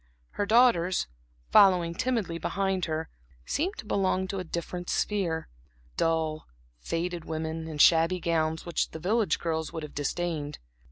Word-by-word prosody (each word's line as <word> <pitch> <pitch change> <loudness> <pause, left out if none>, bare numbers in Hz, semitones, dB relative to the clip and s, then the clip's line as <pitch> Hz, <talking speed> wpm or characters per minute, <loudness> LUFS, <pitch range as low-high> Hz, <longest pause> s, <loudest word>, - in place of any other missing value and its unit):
Her 205 - -2
daughters, 215 -7 +4 0.5
following 180 -4 +6
timidly 205 -6 -1
behind 190 -1 -1
her, 160 0 -3 0.4
seemed 365 +7 -1
to - - -7
belong 190 -2 +1
to 195 - -3
a - - -3
different 175 +1 -5
sphere; 175 -6 -1 0.5
dull, 160 -1 0 0.3
faded 170 - -3
women, 160 0 -4
in 155 -2 -6
shabby 165 +4 +5
gowns 160 -1 0
which 170 - -1
the 160 - -8
village 205 +2 +1
girls 160 -2 -2
would 160 - -5
have 150 - -8
disdained. 150 0 -2
170 Hz, 145 wpm, -28 LUFS, 160-190 Hz, 0.5 s, following